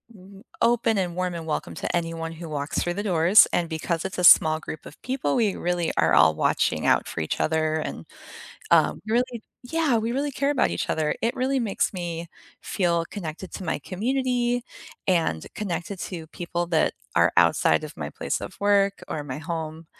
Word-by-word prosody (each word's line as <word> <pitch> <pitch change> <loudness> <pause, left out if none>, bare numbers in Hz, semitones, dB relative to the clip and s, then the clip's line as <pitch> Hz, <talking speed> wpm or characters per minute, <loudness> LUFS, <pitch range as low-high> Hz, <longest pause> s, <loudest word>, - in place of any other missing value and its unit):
m 195 +1 -15 0.2
open 230 -2 +3
and 180 -3 -1
warm 180 0 -1
and 165 - -6
welcome 155 - -3
to - - -3
anyone 165 -1 -3
who 165 0 -8
walks 145 -1 -2
through 175 - -1
the 200 - -2
doors, 180 +1 +6
and 170 -2 0
because 165 +1 -2
it's 190 - -4
a - - -1
small 155 -2 +7
group 155 - -8
of - - -13
people, 255 - -1
we 215 -4 +2
really 175 -1 -1
are 80 -2 +3
all 75 +1 +6
watching - - +1
out - - +3
for 80 - -4
each 80 - -2
other 155 0 +1
and, 150 - -4 0.7
um, - - +4
really 240 +1 0 0.3
yeah, 320 -5 +2
we 225 +2 -2
really 280 +3 -1
care 280 +2 0
about 285 -3 +2
each - - -3
other. 155 -1 0
It 230 - +1
really 265 +1 +1
makes 215 -4 0
me 170 -2 -5 0.3
feel 170 -3 0
connected 175 -1 -7
to 190 - -6
my 160 - -2
community 245 +3 -1 0.5
and 165 - +1
connected 185 -1 -4
to 165 -4 -6
people 175 +1 -3
that 165 -2 +2 0.2
are - - +4
outside - - +4
of - - -9
my - - -5
place - - -3
of - - -8
work 200 -1 +2
or 150 -2 -4
my 130 -1 -5
home, 160 0 -5
175 Hz, 190 wpm, -25 LUFS, 160-215 Hz, 0.7 s, small